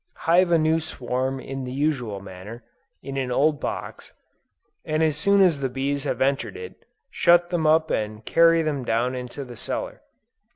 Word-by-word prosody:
Hive 175 Hz, +2 st, +4 dB
a 170 Hz, -, +5 dB
new 160 Hz, +1 st, +2 dB
swarm 130 Hz, -3 st, -3 dB
in 135 Hz, 0 st, -6 dB
the 125 Hz, -, -5 dB
usual 130 Hz, -8 st, -2 dB
manner, 100 Hz, +5 st, -10 dB, 0.4 s
in 135 Hz, 0 st, -6 dB
an 130 Hz, -2 st, -2 dB
old 145 Hz, +3 st, +2 dB
box, -, -, -6 dB, 0.7 s
and 155 Hz, +1 st, 0 dB
as 155 Hz, -2 st, +2 dB
soon 200 Hz, +6 st, +4 dB
as 170 Hz, -6 st, +3 dB
the 135 Hz, -1 st, -1 dB
bees 140 Hz, +2 st, -2 dB
have -, -, -2 dB
entered 135 Hz, -, 0 dB
it, 455 Hz, 0 st, -10 dB, 0.3 s
shut 175 Hz, 0 st, +4 dB
them 165 Hz, -3 st, +1 dB
up 160 Hz, +1 st, +3 dB
and 110 Hz, 0 st, -3 dB
carry 165 Hz, 0 st, +4 dB
them 145 Hz, -4 st, -2 dB
down 120 Hz, +2 st, 0 dB
into 125 Hz, +2 st, -6 dB
the 120 Hz, -1 st, -10 dB
cellar. -, -, -5 dB
140 Hz, 175 wpm, -24 LUFS, 125-160 Hz, 0.7 s, a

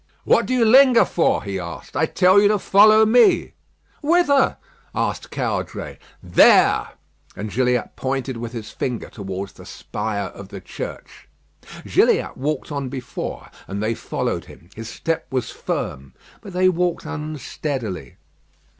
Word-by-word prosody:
"What -, -, +3 dB
do 255 Hz, -, -1 dB
you 240 Hz, -2 st, +3 dB
linger 255 Hz, +1 st, +6 dB
for?" 170 Hz, -, +1 dB
he 100 Hz, -2 st, -4 dB
asked. 85 Hz, -1 st, -8 dB
"I 160 Hz, +4 st, +2 dB
tell 185 Hz, +4 st, +4 dB
you 205 Hz, -, +5 dB
to 210 Hz, 0 st, +3 dB
follow 215 Hz, +3 st, +6 dB
me." 235 Hz, +2 st, +4 dB, 0.5 s
"Whither?" 290 Hz, -3 st, +3 dB, 0.4 s
asked -, -, -2 dB
Caudray. -, -, -4 dB, 0.2 s
"There!" -, -, +5 dB, 0.5 s
And 105 Hz, 0 st, -6 dB
Gilliatt 125 Hz, +2 st, 0 dB
pointed 130 Hz, 0 st, -3 dB
with 115 Hz, 0 st, -6 dB
his 115 Hz, -3 st, -7 dB
finger 125 Hz, -4 st, -4 dB
towards 95 Hz, -1 st, -6 dB
the -, -, -14 dB
spire 100 Hz, -2 st, -4 dB
of 100 Hz, -, -11 dB
the 100 Hz, 0 st, -9 dB
church. -, -, -9 dB, 0.6 s
Gilliatt -, -, +2 dB
walked 150 Hz, +2 st, -3 dB
on 140 Hz, -2 st, -3 dB
before, 125 Hz, -1 st, -6 dB, 0.2 s
and 100 Hz, +1 st, -5 dB
they 110 Hz, +1 st, 0 dB
followed -, -, -3 dB
him. 85 Hz, +3 st, -16 dB
His 115 Hz, 0 st, -7 dB
step 165 Hz, +4 st, -3 dB
was 130 Hz, -3 st, -2 dB
firm; 65 Hz, 0 st, -5 dB, 0.3 s
but 195 Hz, -, -10 dB
they 185 Hz, +1 st, +3 dB
walked 180 Hz, -2 st, 0 dB
unsteadily. 145 Hz, -, -5 dB
135 Hz, 145 wpm, -21 LUFS, -, 0.6 s, linger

